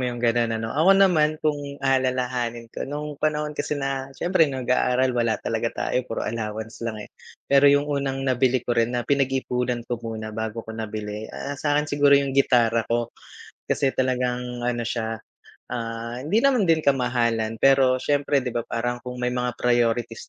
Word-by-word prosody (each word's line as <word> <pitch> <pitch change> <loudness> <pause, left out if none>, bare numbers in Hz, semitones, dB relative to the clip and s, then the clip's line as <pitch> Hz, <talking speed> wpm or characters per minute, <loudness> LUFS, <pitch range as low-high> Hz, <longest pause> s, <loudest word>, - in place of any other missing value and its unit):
mo 125 - 0
yung 120 - -5
gano'n, 120 -1 +1
ano? 115 0 -4
Ako 185 +6 +5
naman 155 -6 +4
kung 145 -2 -1
aalalahanin 125 -3 -1
ko, - - -5
nung 150 0 -5
panahon 150 0 0
kasi 150 - -3
na 135 -1 -3
siyempre 175 -4 +2
nag-aaral, 130 -1 +1
wala 115 -2 +1
talaga 115 0 -1 0.2
tayo 125 - +2
puro 115 - -3
allowance 110 0 -5
lang, 110 -2 -4
eh. - - -19 0.3
Pero 140 +1 +5
yung 145 +1 +4
unang 140 -2 -2
nabili 130 -1 +1
ko 120 - 0
rin 115 +1 +1
na 120 - -2
pinag-iipunan 125 -3 0
ko 120 -1 -4
muna 110 -1 -6
bago 110 +1 -4
ko 110 - -8
nabili, 110 -1 -5
ah, 140 - -6
sa'kin 145 +1 0
siguro 145 -1 +4
yung 140 -1 0
gitara 120 -4 +3
ko 120 0 -1 0.6
kasi 135 -2 +1
talagang 125 -1 -1
ano 120 -1 -1
siya, 115 -1 -3 0.5
ah, 115 +1 -5
hindi 155 +11 +1
naman 250 -10 +3
din 160 -1 +3
kamahalan 120 -4 +1
pero 135 -1 +4
siyempre 145 +1 +1
‘di 125 - -3
ba, 120 - 0
parang 120 +1 -3
kung 125 0 -7
may 125 0 -1
mga 125 -1 -2
priorities 120 -1 0
125 Hz, 175 wpm, -24 LUFS, 115-140 Hz, 0.6 s, Ako